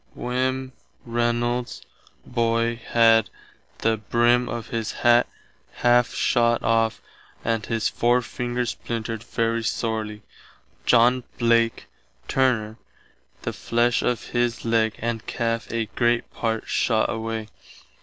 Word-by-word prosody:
Wm. 130 Hz, +1 st, -2 dB, 0.3 s
Reynolds's 120 Hz, +1 st, -1 dB, 0.4 s
boy 115 Hz, -1 st, 0 dB
had 115 Hz, -2 st, +4 dB, 0.5 s
the 110 Hz, 0 st, +1 dB
brim 120 Hz, +3 st, +2 dB
of 120 Hz, -1 st, -5 dB
his 115 Hz, -1 st, -2 dB
hatt 120 Hz, 0 st, +4 dB, 0.6 s
½ 120 Hz, 0 st, +4 dB
shott 120 Hz, -1 st, +2 dB
off 115 Hz, 0 st, +1 dB, 0.4 s
and 115 Hz, -1 st, 0 dB
his 115 Hz, -2 st, 0 dB
forefinger 120 Hz, 0 st, 0 dB
splintered 115 Hz, -2 st, -4 dB
very 115 Hz, 0 st, -1 dB
sorely. 110 Hz, -2 st, -2 dB, 0.6 s
John 125 Hz, +1 st, +5 dB
Blake, 115 Hz, -1 st, +2 dB, 0.4 s
turner, 115 Hz, -4 st, +1 dB, 0.6 s
the -, -, -3 dB
flesh 120 Hz, +1 st, +1 dB
of 125 Hz, -2 st, -1 dB
his 120 Hz, -1 st, -1 dB
legg 115 Hz, -1 st, +2 dB
and 115 Hz, -1 st, -3 dB
calfe 115 Hz, -1 st, -2 dB
a 115 Hz, -1 st, -1 dB
great 120 Hz, -1 st, +1 dB
part 115 Hz, -1 st, -2 dB
shott 110 Hz, -3 st, +1 dB
away. 115 Hz, -1 st, -4 dB
115 Hz, 110 wpm, -24 LUFS, 115-120 Hz, 0.6 s, John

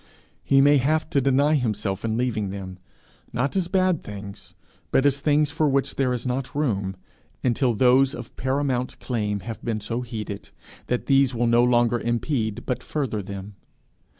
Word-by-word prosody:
He 135 Hz, 0 st, +4 dB
may 145 Hz, +1 st, +6 dB
have 155 Hz, +5 st, +1 dB
to 140 Hz, -, +3 dB
deny 140 Hz, +3 st, +3 dB
himself 105 Hz, -7 st, -1 dB
in 110 Hz, -1 st, -1 dB
leaving 115 Hz, -5 st, -1 dB
them 95 Hz, -1 st, -7 dB, 0.5 s
not 140 Hz, +7 st, -1 dB
as 185 Hz, -3 st, +1 dB
bad 185 Hz, -2 st, +2 dB
things, 100 Hz, -1 st, -9 dB, 0.3 s
but 135 Hz, -, +2 dB
as 140 Hz, 0 st, +2 dB
things 150 Hz, -1 st, +2 dB
for 155 Hz, -1 st, +1 dB
which 135 Hz, 0 st, +1 dB
there 130 Hz, -2 st, +1 dB
is 125 Hz, 0 st, -3 dB
not 130 Hz, +2 st, -3 dB
room 100 Hz, -10 st, -1 dB, 0.5 s
until 125 Hz, -1 st, +2 dB
those 130 Hz, +3 st, +4 dB
of 120 Hz, -1 st, -9 dB
paramount 130 Hz, -1 st, -1 dB
claim 105 Hz, -5 st, -2 dB
have 110 Hz, +4 st, -7 dB
been 115 Hz, -2 st, -1 dB
so 115 Hz, +4 st, -3 dB
heeded, 110 Hz, -4 st, -6 dB, 0.4 s
that 125 Hz, -, -1 dB
these 135 Hz, -2 st, +3 dB
will 120 Hz, +1 st, +1 dB
no 120 Hz, +1 st, +4 dB
longer 120 Hz, -1 st, +3 dB
impede 120 Hz, -2 st, -1 dB
but 125 Hz, -1 st, -2 dB
further 130 Hz, -8 st, -2 dB
them. 100 Hz, +1 st, -7 dB
125 Hz, 170 wpm, -24 LUFS, 110-140 Hz, 0.5 s, may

